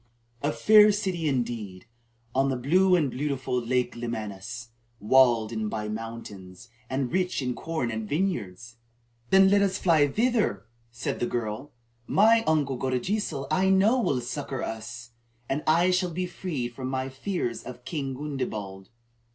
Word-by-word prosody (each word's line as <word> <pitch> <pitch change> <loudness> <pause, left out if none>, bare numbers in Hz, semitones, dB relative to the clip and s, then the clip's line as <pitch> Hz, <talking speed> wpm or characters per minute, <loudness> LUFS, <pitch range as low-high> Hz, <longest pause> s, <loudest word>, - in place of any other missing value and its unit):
"A 145 - +1
fair 210 +4 +6
city 190 -6 -1
indeed, 115 -7 -3 0.5
on 135 +1 +2
the 135 - 0
blue 180 +9 +3
and 150 -7 +1
beautiful 130 -2 -2
Lake 125 +1 0
Lemanus, 115 -1 -5 0.3
walled 120 -1 +4
in 110 -2 -2
by 105 -1 -4
mountains, 110 -3 -8 0.2
and 130 -1 -1
rich 185 -1 0
in 125 -2 -1
corn 160 -4 -3
and 110 -1 -4
vineyards." 115 - -2 0.5
"Then 190 0 +6
let 200 0 +5
us 195 -1 +1
fly 160 -5 +4
thither," 225 - 0 0.2
said 115 +1 -4
the 120 - 0
girl. 115 +4 -4 0.4
"My 225 +3 +5
uncle 145 -4 +1
Godegesil 140 - -1
I 185 +4 +3
know 205 +7 +4
will 130 - 0
succor 135 +1 -4
us, 115 +1 -6 0.4
and 140 +3 -1
I 170 +4 +4
shall 180 0 +1
be 180 +2 -3
freed 170 -8 -4
from 130 +1 -5
my 130 0 -2
fears 135 - -3
of 125 0 -10
King 135 -2 -3
Gundebald." 110 -9 -5
130 Hz, 150 wpm, -27 LUFS, 115-175 Hz, 0.5 s, fair